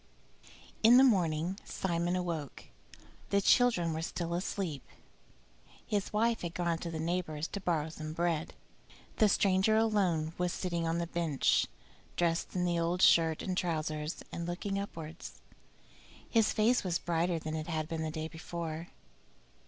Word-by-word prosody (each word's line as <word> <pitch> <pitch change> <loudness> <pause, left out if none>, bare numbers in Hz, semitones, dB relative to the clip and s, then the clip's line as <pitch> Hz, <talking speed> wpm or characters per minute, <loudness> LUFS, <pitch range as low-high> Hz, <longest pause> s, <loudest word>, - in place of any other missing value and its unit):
V - - -19 0.3
In 235 +3 +8
the 260 - +8
morning 180 -5 +2
Simon 175 -1 -1
awoke. 170 -6 -4 0.7
The 200 - +3
children 200 -6 +3
were 160 - -3
still 170 0 -3
asleep; 175 -4 -3 1.0
his 205 -2 -1
wife 230 +2 +1
had 170 -1 -5
gone 170 -2 0
to 170 - -5
the 160 -1 -4
neighbor's 165 -2 -2
to 200 - -5
borrow 160 -4 0
some 155 -1 -6
bread. 165 -1 -1 0.6
The 215 - +5
stranger 195 +2 +3
alone 185 -8 +1
was 180 -1 0
sitting 170 -3 -2
on 165 +1 0
the 170 - -1
bench, 165 -4 +1 0.5
dressed 170 0 0
in 180 -1 +1
the 175 -1 +1
old 170 +2 0
shirt 160 -2 +5
and 185 - -2
trousers, 155 -2 -2
and 170 0 -4
looking 195 +3 -2
upwards. 165 -5 -7 0.9
His 225 -2 +3
face 230 +4 +3
was 175 -3 0
brighter 170 0 0
than 155 -1 -5
it 155 0 -4
had 155 -2 -2
been 165 -1 -3
the 160 - -2
day 155 0 -4
before. 165 0 -6
170 Hz, 155 wpm, -32 LUFS, 160-185 Hz, 1.0 s, In